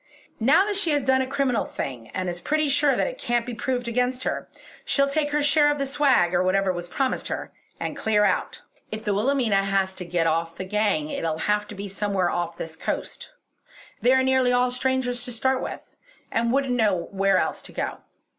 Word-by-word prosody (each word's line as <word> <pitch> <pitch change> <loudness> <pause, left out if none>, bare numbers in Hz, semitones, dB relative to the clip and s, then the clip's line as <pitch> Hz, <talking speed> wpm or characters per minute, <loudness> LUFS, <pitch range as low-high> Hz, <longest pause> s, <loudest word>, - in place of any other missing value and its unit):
Now 280 - +5
that 410 -1 -1
she 395 -4 0
has 290 -2 +1
done 260 0 +3
a 260 - -2
criminal 260 -5 0
thing 120 -4 -6
and 185 0 -4
is 175 0 -4
pretty 305 - +1
sure 285 0 +3
that - - +1
it - - -5
can't 240 -1 0
be 245 - -5
proved 245 +1 -2
against 250 +2 0
her, - - -3 0.3
she'll 275 -1 +2
take 290 +1 0
her 295 0 +1
share 295 0 +4
of 290 - +1
the 275 - -1
swag, 270 -10 +3
or 175 - +3
whatever 190 +1 +2
was 175 0 -5
promised 265 +4 -1
her, - - -4 0.3
and - - -3
clear 210 -1 +2
out. - - -1 0.3
If 215 0 -6
the 205 - +1
Wilhelmina 230 0 +2
has 195 -1 +1
to 190 - -6
get 175 -1 0
off 165 +1 0
the 185 - -4
gang 195 -6 0
it'll 160 -1 -2
have 210 0 +1
to 210 - -9
be 200 +1 -5
somewhere 195 -2 -1
off 170 -1 -3
this 160 0 -6
coast. - - -5 0.7
They 245 - +4
are 260 0 +4
nearly 260 -1 +3
all 250 0 +2
strangers 250 -1 -1
to 250 - -5
start 260 +3 0
with, - - -7 0.4
and 230 +1 +1
wouldn't 270 -1 +1
know 205 -8 +1
where 195 -1 +2
else - - -1
to - - -11
go. - - -3
235 Hz, 215 wpm, -25 LUFS, 190-265 Hz, 0.7 s, Now